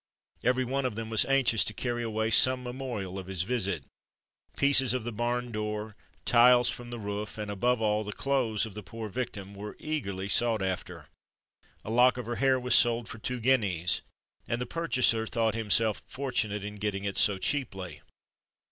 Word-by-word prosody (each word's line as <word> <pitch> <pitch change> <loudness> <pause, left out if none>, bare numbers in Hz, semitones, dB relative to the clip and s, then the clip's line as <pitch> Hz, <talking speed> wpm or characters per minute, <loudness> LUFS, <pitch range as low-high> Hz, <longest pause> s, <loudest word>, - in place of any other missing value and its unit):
Every 125 +1 +2
one 135 +2 -1
of 115 - -6
them 115 0 -5
was 110 - +4
anxious 135 -5 +3
to 110 - -1
carry 120 -1 -2
away 110 -1 -1
some 130 +3 +5
memorial 120 -7 -5
of 95 - -9
his 95 -3 0
visit. 100 - -2 0.7
Pieces 135 -2 +4
of 125 - -2
the 120 - -4
barn 120 +2 -2
door, 105 0 -4 0.3
tiles 125 0 +6
from 120 -1 -8
the 120 - -5
roof, 105 0 -5
and, 105 -1 -4
above 115 +4 +1
all, 105 0 +1
the 105 - -5
clothes 120 -3 0
of 110 - -9
the 105 - -6
poor 110 +2 -7
victim, 100 -3 -5
were 105 +1 -8
eagerly 100 -12 -3
sought 110 0 +2
after. 95 -1 -4 0.8
A 110 - -4
lock 125 +2 +5
of 125 - -5
her 120 +1 -3
hair 135 -1 +3
was 125 0 0
sold 120 -1 +4
for 115 - -8
two 125 +3 -3
guineas, 105 -9 +1 0.5
and 120 - -1
the 125 - -2
purchaser 125 -7 +2
thought 115 -1 0
himself 110 -1 +1
fortunate 115 -7 -2
in 105 0 -7
getting 100 -1 -2
it 100 -1 -1
so 100 -2 +4
cheaply. 95 -6 -3
115 Hz, 185 wpm, -29 LUFS, 105-125 Hz, 0.8 s, tiles